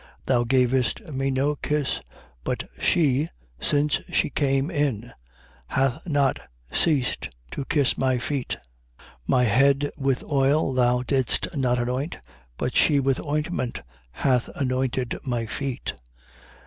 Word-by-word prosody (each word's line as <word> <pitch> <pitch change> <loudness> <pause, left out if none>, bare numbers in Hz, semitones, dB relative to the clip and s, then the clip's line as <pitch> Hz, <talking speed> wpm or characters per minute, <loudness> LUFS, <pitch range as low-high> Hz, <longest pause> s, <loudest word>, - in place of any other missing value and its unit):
7:45. - - -23 0.2
Thou 120 -2 +3
gavest 130 - +1
me 135 +1 0
no 135 +3 +1
kiss. 150 -2 -1 0.4
But - - -2 0.2
she, 145 - +3 0.3
since 145 - +1
she - - +1
cane 135 +2 +1
in, 125 - -1 0.5
hath 135 +5 0
not 140 -3 +2 0.3
ceased 145 -7 +1 0.2
to 135 - -4
kiss 140 -3 +2
my 130 -1 +2
feet. 130 +1 -2 0.4
7:46. - - -21 0.2
My 125 -1 +4
head 140 +5 +3
with 135 -2 0
oil 140 0 +2
thou 125 -1 +3
didst 130 +3 0
not 125 -3 +1
anoint. 125 +6 -2 0.4
But 125 - -2
she 145 -3 +4
with 135 -1 +1
ointment 150 -3 -2 0.3
hath 125 - +1
anointed 130 -2 -1
my 120 -4 -1
feet. 135 +3 -3
135 Hz, 130 wpm, -25 LUFS, 125-145 Hz, 0.5 s, My